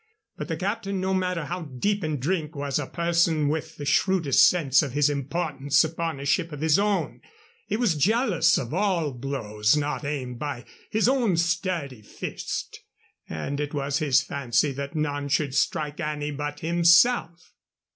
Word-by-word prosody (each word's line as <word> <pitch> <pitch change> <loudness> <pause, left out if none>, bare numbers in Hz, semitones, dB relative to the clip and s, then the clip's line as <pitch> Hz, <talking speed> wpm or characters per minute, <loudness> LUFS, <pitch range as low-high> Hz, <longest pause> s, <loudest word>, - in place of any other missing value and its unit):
But - - -6
the - - -3
captain, 195 0 -2
no 190 +1 -1
matter 180 -4 -1
how 180 +4 -4
deep 170 +8 -2
in 155 -1 -1
drink, 155 +2 -2
was 140 0 -2
a 140 - -4
person 170 -3 +1
with 160 +1 -3
the 145 - -6
shrewdest 165 -1 +4
sense 150 -5 +3
of 140 -5 -4
his 145 0 +3
importance 145 0 0
upon 165 -2 -3
a 140 - -6
ship 170 +3 +1
of 150 -1 -7
his 160 +2 +3
own. 205 -1 -1 0.5
He 210 - -1
was 230 -7 +2
jealous 185 - +2
of 120 +2 -4
all 180 -5 +1
blows 120 -3 0
not 150 +1 -2
aimed 130 -4 -4
by 140 -4 -5 0.2
his 220 +1 +2
own 245 -9 +2
sturdy 170 - -1
fist, 105 - -6 0.5
and 135 - -4
it 150 0 -3
was 140 0 -1
his 140 -3 +3
fancy 135 0 0
that 140 +3 -6
none 145 -2 -2
should 140 -1 0
strike 150 +2 -1
any 150 -2 -3
but 145 0 -5
himself. 170 +2 +3
150 Hz, 165 wpm, -25 LUFS, 140-175 Hz, 0.5 s, shrewdest